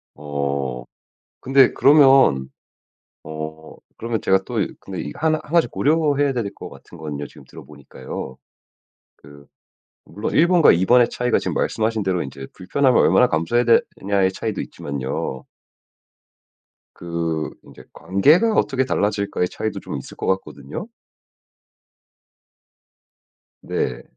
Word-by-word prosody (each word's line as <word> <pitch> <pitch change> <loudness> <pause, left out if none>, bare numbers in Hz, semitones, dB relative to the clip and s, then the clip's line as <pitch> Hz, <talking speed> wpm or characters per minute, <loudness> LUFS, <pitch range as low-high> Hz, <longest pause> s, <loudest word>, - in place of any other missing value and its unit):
어. 70 -3 -3 0.6
근데 135 0 +4
그러면 135 - +5 0.7
어 80 0 -8 0.2
그러면 115 -1 -3
제가 95 - +3
또 125 - -8 0.3
근데 95 -2 -6
이 - - -6
한 160 0 +2
한 155 - -2
가지 170 -1 +3
고려해야 145 -2 +1
될 115 -6 -3
것 - - -9
같은 85 - -15
건요. 75 -2 -5
지금 - - -16
들어 - - -12
보니까요. 65 -2 -9 0.8
그 70 0 -16 0.6
물론 105 - -5
1 165 - +5
번과 175 -4 +6
2 90 +3 +1
번의 120 +1 +5
차이가 125 -1 0
지금 - - -3
말씀하신 110 -1 -1
대로 95 -2 -1
이제 65 0 -8
불편함을 130 +7 +1
얼마나 - - +5
감수해야 85 +10 +1 0.3
되느냐의 95 -1 0
차이도 110 +1 -4
있지만요. 65 -2 -5 1.5
그 85 -2 -3 0.2
이제 - - -14
관계가 155 - +3
어떻게 130 -9 +1
달라질까의 100 -5 -1
차이도 110 - -4
좀 - - -6
있을 - - -10
것 - - -4
같거든요? 95 - -4 2.7
네. - - -3
95 Hz, 265 characters per minute, -21 LUFS, -, 2.7 s, 번과